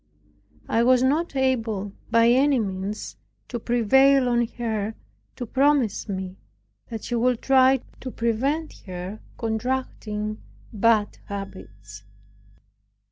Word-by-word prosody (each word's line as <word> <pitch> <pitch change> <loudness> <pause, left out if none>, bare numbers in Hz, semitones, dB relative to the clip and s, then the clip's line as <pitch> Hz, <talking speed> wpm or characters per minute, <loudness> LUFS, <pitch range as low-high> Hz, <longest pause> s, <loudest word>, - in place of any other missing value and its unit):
I 230 - +2
was 250 +1 +4
not 295 +4 +1
able, 225 -7 0 0.2
by 230 0 +5
any 270 +3 +4
means, 200 -1 -4 0.3
to 240 - -3
prevail 260 +4 +4
on 240 -1 +2
her 220 -2 -2 0.4
to 245 - -5
promise 265 -4 +1
me 190 -1 -4 0.5
that 225 -2 -6
she - - -4
would 240 0 +2
try 265 -1 +5 0.2
to 260 - -6
prevent 260 +8 -1
her 185 +3 -6 0.2
contracting 220 -2 -3 0.3
bad 215 0 +2
habits. 105 - -8
230 Hz, 110 wpm, -24 LUFS, 210-260 Hz, 0.5 s, by